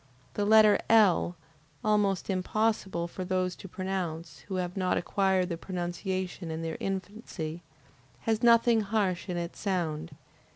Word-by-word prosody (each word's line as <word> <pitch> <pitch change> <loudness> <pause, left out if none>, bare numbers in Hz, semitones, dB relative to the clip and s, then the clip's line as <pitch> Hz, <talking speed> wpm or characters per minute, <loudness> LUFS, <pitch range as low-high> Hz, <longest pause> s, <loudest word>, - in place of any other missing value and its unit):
The 205 - -1
letter 215 0 +6
L, 200 -5 +4 0.5
almost 205 -3 +2
impossible 190 -2 0
for 185 +2 -6
those 185 0 -1
to - - -9
pronounce, 170 -5 -4
who 195 - -4
have 180 -1 -2
not 185 -2 +1
acquired 190 0 +1
the 170 - -3
pronunciation 180 0 -4
in 160 +1 -4
their 160 -1 -3
infancy, 190 -4 -5 0.6
has 225 -1 0
nothing 235 -1 +5
harsh 200 -4 -1
in 175 - -2
its 170 0 -5
sound. 165 -5 -2
185 Hz, 135 wpm, -29 LUFS, 175-205 Hz, 0.6 s, letter